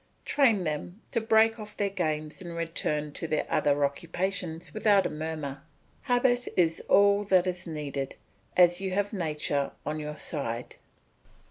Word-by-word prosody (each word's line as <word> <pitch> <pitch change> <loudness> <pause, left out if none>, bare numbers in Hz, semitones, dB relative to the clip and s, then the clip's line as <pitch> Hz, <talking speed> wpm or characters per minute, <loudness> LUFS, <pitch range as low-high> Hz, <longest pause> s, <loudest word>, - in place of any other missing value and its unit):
Train 235 -10 +3
them 160 +5 -4
to 230 - +1
break 225 +1 +4
off 210 -1 -9
their 200 -1 0
games 155 -3 -2
and 170 -2 -7
return 150 -2 -1
to 165 - -5
their 155 -1 0
other 145 0 +2
occupations 170 +3 -3
without 210 -2 +4
a - - -1
murmur. 150 -3 -4 0.4
Habit 245 -1 +2
is 165 -2 +2
all 200 +1 +5
that 185 -2 +4
is 180 -1 -3
needed, 145 -4 -4 0.4
as 175 0 +5
you 190 -1 -2
have 205 +2 0
nature 150 -6 -1
on 155 +1 -2
your 150 0 -5
side. 125 -7 -4
170 Hz, 150 wpm, -28 LUFS, 150-200 Hz, 0.4 s, all